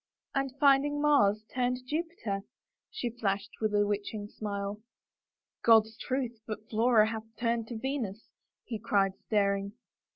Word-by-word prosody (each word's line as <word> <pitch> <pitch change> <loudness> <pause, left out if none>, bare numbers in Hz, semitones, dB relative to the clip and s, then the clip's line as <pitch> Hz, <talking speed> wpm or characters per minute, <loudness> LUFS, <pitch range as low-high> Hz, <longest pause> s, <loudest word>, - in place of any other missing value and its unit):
" - - -61
And 275 -1 0
finding 285 +1 +4
Mars 215 -8 +4
turned 250 0 0
Jupiter," 300 - -3 0.5
she 255 - -3
flashed 205 -2 -2
with 215 -1 +1
a 205 0 +4
witching 205 0 -3
smile. 200 -1 -4 0.4
" - - -62
God's 225 -1 +6
truth, 250 -3 -3
but 215 0 -6
Flora 225 0 +5
hath 220 -1 -5
turned 230 -1 0
Venus," 230 -3 -4 0.3
he 225 -4 -5
cried, 200 -3 +2
staring. 200 -1 +1
220 Hz, 135 wpm, -30 LUFS, 205-255 Hz, 0.5 s, God's